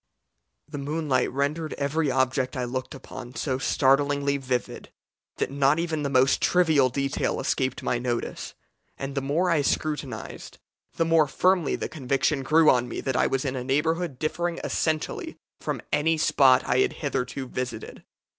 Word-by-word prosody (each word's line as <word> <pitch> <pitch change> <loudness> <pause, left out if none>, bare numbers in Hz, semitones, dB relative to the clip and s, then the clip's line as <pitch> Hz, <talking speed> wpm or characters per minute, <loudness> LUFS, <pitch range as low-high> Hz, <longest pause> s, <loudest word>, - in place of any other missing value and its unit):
The 145 -1 -6
moonlight 145 -3 0
rendered 150 +4 -2
every 145 +2 0
object 130 0 0
I 125 - -1
looked 130 +2 -4
upon 125 -1 -10
so 130 -3 -2
startlingly 140 +1 +2
vivid, 130 -2 -3 0.5
that - - -1
not 140 +1 +3
even 165 -2 -1
the 140 - -1
most 130 0 +3
trivial 160 -7 +4
detail 140 +2 -1
escaped 130 -1 -1
my 120 - 0
notice, 120 -1 -3 0.4
and 135 0 -5
the 140 - -1
more 160 +7 +1
I 160 -3 +3
scrutinized 140 -4 -3 0.4
the 165 - +1
more 165 -2 +4
firmly 180 +1 +2
the - - -3
conviction 135 0 0
grew 155 +4 +4
on 125 -1 +1
me - - -4
that 130 -2 -2
I - - +3
was 135 +1 -1
in 135 -1 -2
a 125 - -3
neighbourhood 155 +3 0
differing 170 +4 -2
essentially 155 -1 -2 0.2
from - - -4
any 160 +2 +2
spot 135 -4 +4
I 125 - +2
had - - +2
hitherto 130 -2 -3
visited. 125 -1 -6
140 Hz, 160 wpm, -26 LUFS, 130-155 Hz, 0.5 s, trivial